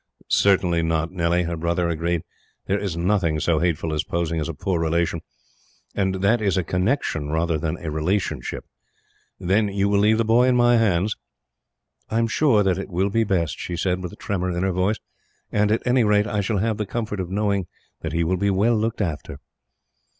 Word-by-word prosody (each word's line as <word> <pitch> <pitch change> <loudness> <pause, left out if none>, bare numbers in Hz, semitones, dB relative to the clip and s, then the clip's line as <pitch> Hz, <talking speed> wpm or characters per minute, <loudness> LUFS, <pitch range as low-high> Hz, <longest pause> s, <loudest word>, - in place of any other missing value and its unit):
"Certainly 90 -4 +3
not, 80 0 0
Nellie," 90 0 +1
her 85 0 -3
brother 85 +1 0
agreed. 85 0 -1 0.4
"There 100 +2 0
is 95 -5 -3
nothing 85 -3 +1
so 80 0 +1
hateful 80 -2 0
as 75 0 0
posing 85 -1 -2
as 80 - -3
a 85 - -5
poor 90 +3 -1
relation 85 0 0 0.7
and 95 -1 -1
that 110 +3 +3
is 100 -3 +1
a 95 - +1
connection 90 - -1
rather 80 0 0
than 80 +2 -2
a 80 -3 -5
relationship. 80 -3 -2 0.7
Then 100 +3 +2
you 100 0 0
will 100 0 +3
leave 105 +2 +4
the 115 - +1
boy 120 +3 +4
in 130 - +3
my 120 -1 +5
hands?" 105 -2 +1 0.9
"I 110 - -1
am 115 - +3
sure 115 -2 +3
that 95 -1 +1
it 95 - -6
will 95 +2 0
be 115 +2 +2
best," 90 -6 -1
she 85 - -4
said, 90 +1 0
with 90 -2 -5
a - - -11
tremor 90 -2 -2
in 90 0 -2
her 95 - +1
voice, 95 +4 +1 0.5
"and 105 0 +2
at 110 - 0
any 125 0 +3
rate, 105 -1 +3
I 105 0 -1
shall 100 +1 -1
have 110 +2 0
the 105 - -3
comfort 105 -1 -3
of 90 -2 -3
knowing 100 -2 0 0.3
that - - -4
he 85 - 0
will 90 +3 0
be 100 +2 +1
well 105 +5 +2
looked 110 +1 -1
after." 80 -6 -3
95 Hz, 205 wpm, -23 LUFS, 85-105 Hz, 0.9 s, my